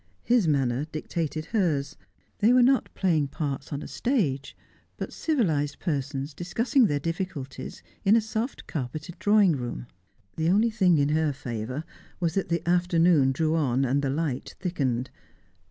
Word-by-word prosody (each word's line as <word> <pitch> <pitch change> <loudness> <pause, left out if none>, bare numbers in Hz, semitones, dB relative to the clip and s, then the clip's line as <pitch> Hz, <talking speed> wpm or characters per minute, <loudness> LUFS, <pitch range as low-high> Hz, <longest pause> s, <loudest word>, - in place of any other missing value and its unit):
His 235 -7 +3
manner 135 -2 +1
dictated 155 0 -4
hers. 155 -8 +1 0.4
They 215 +3 +5
were 250 0 +6
not 265 +1 +3
playing 160 -7 +2
parts 140 -1 -4
on 145 -1 -4
a - - -7
stage, 160 - -1 0.4
but - - -5
civilised 160 - 0
persons 140 -3 -3
discussing 230 - +2
their 145 -5 0
difficulties 150 -5 -5 0.2
in 205 +2 +5
a - - +6
soft 220 +3 -4
carpeted 155 +5 -5
drawing 205 -3 +5
room. 120 - -4 0.5
The 160 +1 +1
only 215 +5 +3
thing 185 -6 +3
in 140 0 +2
her 155 0 +2
favour 125 +2 -5 0.4
was 170 -3 0
that 195 -2 -1
the 170 -1 -1
afternoon 175 -5 +4
drew 155 +4 0
on, 135 -4 +1
and 135 +3 +1
the 140 - -1
light 140 -2 -2
thickened. 135 -9 -1
155 Hz, 155 wpm, -26 LUFS, 140-185 Hz, 0.5 s, were